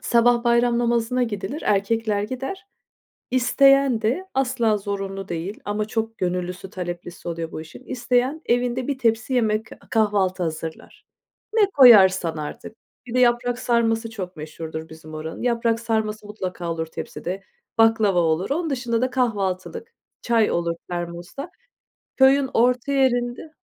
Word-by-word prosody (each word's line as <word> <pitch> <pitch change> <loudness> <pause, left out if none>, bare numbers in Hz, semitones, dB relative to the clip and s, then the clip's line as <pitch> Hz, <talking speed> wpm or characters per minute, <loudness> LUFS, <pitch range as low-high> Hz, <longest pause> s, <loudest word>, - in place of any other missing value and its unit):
Sabah 240 0 +3
bayram 235 0 +3
namazına 240 +1 +1
gidilir, 215 +4 -3
erkekler 210 +1 +1
gider. 265 - -5 0.7
İsteyen 265 -1 +4
de, 250 +13 0
asla 250 -5 +1
zorunlu 195 -1 -4
değil 175 +5 -4
ama 210 +1 -1
çok 225 +1 -3
gönüllüsü, 180 0 -3
taleplisi 175 -1 -7
oluyor 165 -1 -4
bu - - -6
işin. 160 +11 -12
İsteyen 255 +4 0
evinde 245 +1 0
bir 280 - -1
tepsi 235 +1 0
yemek, 220 -2 +1 0.2
kahvaltı 200 -4 +1
hazırlar. 160 -1 -6 0.5
Ne 440 -2 +5
koyarsan 190 - +7
artık. 150 +8 -7 0.3
Bir 235 - -7
de 255 - +2
yaprak 245 0 +2
sarması 230 -1 +1
çok 185 -5 -7
meşhurdur 160 +1 -7
bizim 160 0 -12
oranın. 155 +1 -6
Yaprak 230 -2 +1
sarması 220 -2 -2
mutlaka 185 -4 -4
olur 165 -1 -2
tepside, 180 +3 -6 0.3
baklava 220 -5 +4
olur. 165 +2 +1
Onun 320 +3 -1
dışında 240 -3 -1
da 255 - +1
kahvaltılık, 240 - -2 0.3
çay 230 -2 +2
olur 170 -1 0
termosta. 175 - -5 0.7
Köyün 265 0 +5
orta 250 +3 +2
yerinde. 250 +2 0
225 Hz, 135 wpm, -23 LUFS, 185-245 Hz, 0.7 s, koyarsan